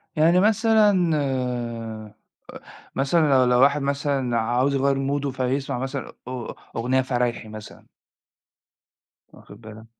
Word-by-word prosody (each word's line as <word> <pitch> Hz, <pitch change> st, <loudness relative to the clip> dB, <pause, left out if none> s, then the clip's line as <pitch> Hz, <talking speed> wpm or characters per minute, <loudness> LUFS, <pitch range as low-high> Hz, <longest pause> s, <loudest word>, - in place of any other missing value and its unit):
يعني 165 Hz, +4 st, +4 dB
مثلًا 210 Hz, -5 st, +3 dB
أ 120 Hz, -5 st, -3 dB, 0.8 s
مثلًا 150 Hz, +3 st, +2 dB
لو 130 Hz, -1 st, +5 dB
لو 125 Hz, 0 st, +3 dB
واحد 140 Hz, +2 st, +4 dB
مثلًا 140 Hz, -3 st, -1 dB
عاوز 125 Hz, +5 st, +1 dB
يغيّر 135 Hz, 0 st, +2 dB
مُوده 140 Hz, +1 st, -1 dB
فيسمع 130 Hz, 0 st, -2 dB
مثلًا 135 Hz, +1 st, -5 dB, 0.2 s
أ 125 Hz, -2 st, -6 dB, 0.2 s
أغنية 125 Hz, +3 st, +1 dB
فرايحي 120 Hz, -3 st, -2 dB
مثلًا. 110 Hz, 0 st, -11 dB, 1.4 s
واخد 105 Hz, +2 st, -16 dB
بالك؟ 110 Hz, 0 st, -12 dB
130 Hz, 115 wpm, -23 LUFS, 120-145 Hz, 1.4 s, لو